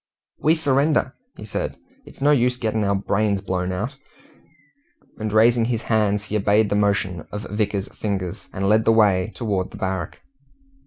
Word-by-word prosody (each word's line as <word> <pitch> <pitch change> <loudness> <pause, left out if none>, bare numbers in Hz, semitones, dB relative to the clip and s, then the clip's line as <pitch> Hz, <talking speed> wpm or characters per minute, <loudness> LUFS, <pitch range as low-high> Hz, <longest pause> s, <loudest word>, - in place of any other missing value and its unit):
"We 155 +2 +3
surrender," 145 -2 +1 0.2
he - - -8
said. - - -4 0.3
"It's - - -9
no 145 - +5
use 125 -3 +2
getting 110 -3 -1
our 100 0 +1
brains 100 +1 0
blown 95 -2 -2
out." 110 +9 -4 1.2
And 110 0 -3
raising 115 +2 +4
his 115 -1 -2
hands, 105 -2 +1
he 105 0 -5
obeyed 105 +1 +2
the - - +2
motion 100 -4 0
of 105 0 -5
Vickers's 105 -2 -2
fingers, 95 -4 -4
and 95 +1 -2
led 110 +2 +3
the - - +5
way 105 -2 +3
towards 100 -6 -2
the - - -11
barrack. 95 -4 -3
105 Hz, 165 wpm, -22 LUFS, 100-115 Hz, 1.2 s, no